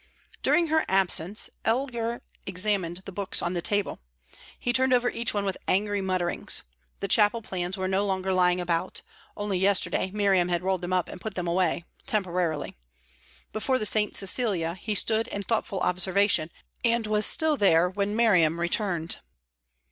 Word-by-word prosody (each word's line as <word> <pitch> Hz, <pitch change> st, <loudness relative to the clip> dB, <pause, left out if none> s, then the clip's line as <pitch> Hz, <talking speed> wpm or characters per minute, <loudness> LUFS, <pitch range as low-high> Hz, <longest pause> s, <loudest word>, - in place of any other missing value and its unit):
During 340 Hz, -2 st, +2 dB
her 315 Hz, 0 st, +2 dB
absence, 190 Hz, 0 st, +2 dB, 0.2 s
Elgar 235 Hz, -1 st, -1 dB, 0.2 s
examined 185 Hz, -2 st, +1 dB
the -, -, -7 dB
books 195 Hz, 0 st, -2 dB
on 175 Hz, -, -1 dB
the 175 Hz, -, -2 dB
table. 205 Hz, +1 st, -1 dB, 0.6 s
He 245 Hz, -, -2 dB
turned 260 Hz, 0 st, +3 dB
over 245 Hz, 0 st, +2 dB
each 235 Hz, 0 st, -2 dB
one 205 Hz, -1 st, -2 dB
with 195 Hz, -, -3 dB
angry 205 Hz, +1 st, +1 dB
mutterings. 185 Hz, -2 st, -1 dB, 0.4 s
The 200 Hz, -, -1 dB
chapel 210 Hz, +3 st, +3 dB
plans 185 Hz, -1 st, -4 dB
were 190 Hz, 0 st, -2 dB
no 190 Hz, +1 st, +1 dB
longer 190 Hz, -1 st, -1 dB
lying 180 Hz, -1 st, +3 dB
about; 175 Hz, 0 st, -1 dB, 0.3 s
only 205 Hz, -3 st, -2 dB
yesterday 190 Hz, -1 st, +2 dB
Miriam 195 Hz, -3 st, +2 dB
had 175 Hz, 0 st, -1 dB
rolled 190 Hz, -1 st, 0 dB
them 175 Hz, +1 st, -5 dB
up 185 Hz, -2 st, +1 dB
and 180 Hz, -, -10 dB
put 220 Hz, -3 st, -6 dB
them 180 Hz, -1 st, -3 dB
away 170 Hz, -1 st, 0 dB, 0.2 s
temporarily. 180 Hz, -, -1 dB, 0.8 s
Before 255 Hz, +5 st, 0 dB
the 215 Hz, -, -3 dB
"St. 210 Hz, 0 st, +2 dB
Cecilia" 195 Hz, -5 st, 0 dB
he 210 Hz, +4 st, -4 dB
stood 220 Hz, +2 st, +1 dB
in 200 Hz, -, -5 dB
thoughtful 210 Hz, -3 st, -2 dB
observation, 185 Hz, -1 st, +2 dB, 0.3 s
and 235 Hz, -1 st, +2 dB
was 210 Hz, 0 st, +2 dB
still 315 Hz, -1 st, +4 dB
there 180 Hz, -, +4 dB
when 200 Hz, +3 st, -2 dB
Miriam 180 Hz, -8 st, +3 dB
returned. 175 Hz, -1 st, 0 dB
195 Hz, 165 wpm, -26 LUFS, 180-215 Hz, 0.8 s, still